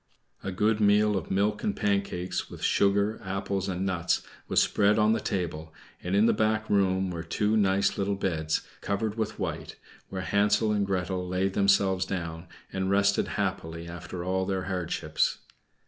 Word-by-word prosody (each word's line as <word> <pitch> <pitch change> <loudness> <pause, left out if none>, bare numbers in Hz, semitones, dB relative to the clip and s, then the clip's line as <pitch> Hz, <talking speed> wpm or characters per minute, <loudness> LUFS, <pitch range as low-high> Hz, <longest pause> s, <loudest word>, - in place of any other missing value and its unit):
A 95 - -3
good 105 +3 +1
meal 105 0 +4
of 95 - -3
milk 100 +2 0
and 210 -2 0
pancakes, 100 -3 -1
with - - -10
sugar, 100 +2 +2
apples 95 0 -2
and 95 +1 -2
nuts, 90 -2 0 0.2
was - - +3
spread 105 +1 +3
on 110 0 +4
the 115 - 0
table, 80 -6 -3 0.3
and 90 +2 -1
in 105 +2 +5
the - - +4
back 110 0 +1
room 95 -2 +2
were 85 -1 -4
two 105 +6 0
nice 100 -1 +2
little 100 0 0
beds, 80 -5 -1 0.2
covered 100 +1 -1
with 110 -2 -3
white, - - -4 0.3
where 95 -1 -4
Hansel 105 +2 +2
and 100 -2 +1
Gretel 90 -1 -1
laid 95 +1 0
themselves 100 -1 +3
down, 85 -2 -4 0.3
and 95 0 -1
rested 100 0 +3
happily 85 +1 -3
after 85 +1 -6
all 95 +1 -1
their 95 -2 -1
hardships. 90 -3 -1
95 Hz, 165 wpm, -28 LUFS, 90-100 Hz, 0.3 s, in